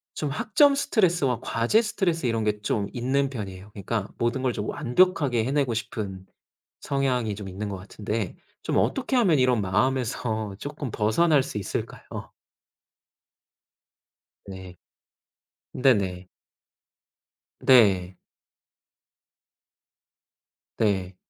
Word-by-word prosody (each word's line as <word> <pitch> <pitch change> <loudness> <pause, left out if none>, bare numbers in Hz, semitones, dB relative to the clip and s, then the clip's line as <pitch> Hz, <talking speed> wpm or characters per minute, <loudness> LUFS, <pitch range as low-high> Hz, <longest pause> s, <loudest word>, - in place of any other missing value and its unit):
좀 150 - -2
학점 280 - +4
스트레스와 175 - +1
과제 120 - +2
스트레스 175 - -1
이런 115 -1 0
게 105 -1 -1
좀 100 -1 -1
있는 135 +3 0
편이에요. 100 -6 -7
그러니까 100 +1 -3
모든 120 +3 0
걸 125 -2 +1
좀 105 0 -4
완벽하게 130 -4 +2
해내고 135 -2 +1
싶은 95 -4 -5 0.6
성향이 130 -6 0
좀 100 -1 -7
있는 100 +3 -5
것 100 - -4
같은데 105 +1 -4 0.3
좀 - - 0
어떻게 265 0 0
하면 190 -11 +4
이런 125 -3 +3
마음에서 110 0 -1
쪼끔 145 0 -5
벗어날 135 +8 +3
수 105 - -6
있을까요? 100 - -6 2.2
네. 95 -2 -9 1.0
네네. 95 -8 +1 1.3
네. 95 -8 +4 2.6
네. 95 -4 0
115 Hz, 220 characters per minute, -25 LUFS, 100-140 Hz, 2.6 s, 학점